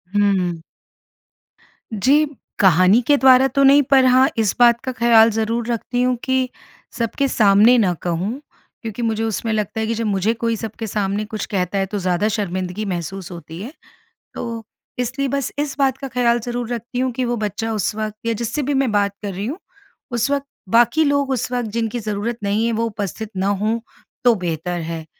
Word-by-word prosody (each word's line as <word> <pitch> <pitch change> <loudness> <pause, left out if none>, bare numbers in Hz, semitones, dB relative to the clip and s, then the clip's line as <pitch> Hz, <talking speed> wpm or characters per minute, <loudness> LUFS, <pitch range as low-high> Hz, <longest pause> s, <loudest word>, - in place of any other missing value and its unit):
हुँ। 190 -5 +1 1.3
जी। 270 +9 +3 0.3
कहानी 185 +4 +5
के 290 - +6
द्वारा 265 0 +6
तो 275 +2 +1
नहीं 275 +1 +7
पर 265 0 +4
हाँ, 255 +1 +5
इस 220 -3 +1
बात 235 -1 +6
का 260 - -2
ख़्याल 235 -2 +5
ज़रूर 225 +2 -1
रखती 240 +1 -2
हूँ 250 0 +2
कि, 260 -1 0 0.4
सबके 235 +4 -1
सामने 215 +1 +5
ना 195 -6 +2
कहूँ 180 +9 -2 0.4
क्योंकि 225 0 -6
मुझे 225 -1 -1
उसमें 225 0 -2
लगता 215 +1 -2
है 220 - 0
कि 230 - 0
जब 230 +1 -2
मुझे 205 +1 +1
कोई 230 0 -1
सबके 225 +1 -6
सामने 205 0 -1
कुछ 215 0 -5
कहता 190 -1 -2
है, 195 - +1
तो 205 +2 -5
ज़्यादा 185 +2 0
शर्मिंदगी 190 -1 -3
महसूस 185 0 -5
होती 170 0 -9
है, 235 +7 -7 0.6
तो 230 -1 -5 0.4
इसलिए 265 +3 -1
बस 275 0 -2
इस 290 -2 -2
बात 270 -2 +2
का 275 - -6
ख़्याल 240 -1 +1
ज़रूर 240 0 -4
रखती 240 +2 -5
हूँ 260 0 0
कि 250 +1 -2
वो 240 0 -1
बच्चा 220 +1 -3
उस 210 -2 -1
वक़्त 215 -1 -4
या 230 - +1
जिससे 235 +6 -3
भी 285 +2 -1
मैं 270 -3 +1
बात 200 -1 +1
कर 200 -2 -3
रही 195 +3 -4
हूँ, 280 +9 -4 0.5
उस 240 +2 0
वक़्त 280 -1 0 0.2
बाकी 240 +8 +4
लोग 285 -1 +1
उस 255 -1 -2
वक़्त 245 -3 -2
जिनकी 230 +1 -2
ज़रूरत 215 +2 -3
नहीं 205 +3 +1
है, 235 - +1
वो 230 +1 0
उपस्थित 210 -1 -5
ना 190 +1 0
हों 210 +3 0 0.4
तो 240 -2 +5
बेहतर 175 -1 -3
है। 165 0 -5
225 Hz, 195 wpm, -20 LUFS, 200-245 Hz, 1.3 s, नहीं